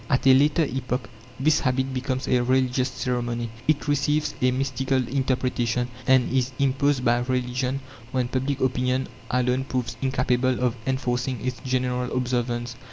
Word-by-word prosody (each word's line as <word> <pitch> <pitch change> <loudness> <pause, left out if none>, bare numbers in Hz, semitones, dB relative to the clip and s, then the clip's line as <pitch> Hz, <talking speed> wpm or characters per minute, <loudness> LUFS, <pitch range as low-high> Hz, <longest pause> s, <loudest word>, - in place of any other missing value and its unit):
At 135 -1 +1
a 135 - +8
later 145 +5 +4
epoch 125 -3 -3 0.3
this 150 +3 +3
habit 130 0 0
becomes 130 0 -2
a 125 - +3
religious 130 +1 +2
ceremony. 120 -2 -2 0.2
It 150 -1 +1
receives 150 +1 +1
a 130 - +4
mystical 130 0 0
interpretation, 125 -2 0 0.2
and 130 -1 +4
is 130 -1 +1
imposed 140 -1 +1
by 120 0 +4
religion, 125 +1 -1 0.3
when 130 -2 0
public 135 +2 -2
opinion 130 0 0 0.2
alone 125 +1 +1
proves 130 -3 -3
incapable 130 -1 +1
of 125 -1 +1
enforcing 125 -2 -1
its 125 -2 -2
general 125 -1 -1
observance. 120 -1 -1
130 Hz, 145 wpm, -25 LUFS, 125-130 Hz, 0.3 s, a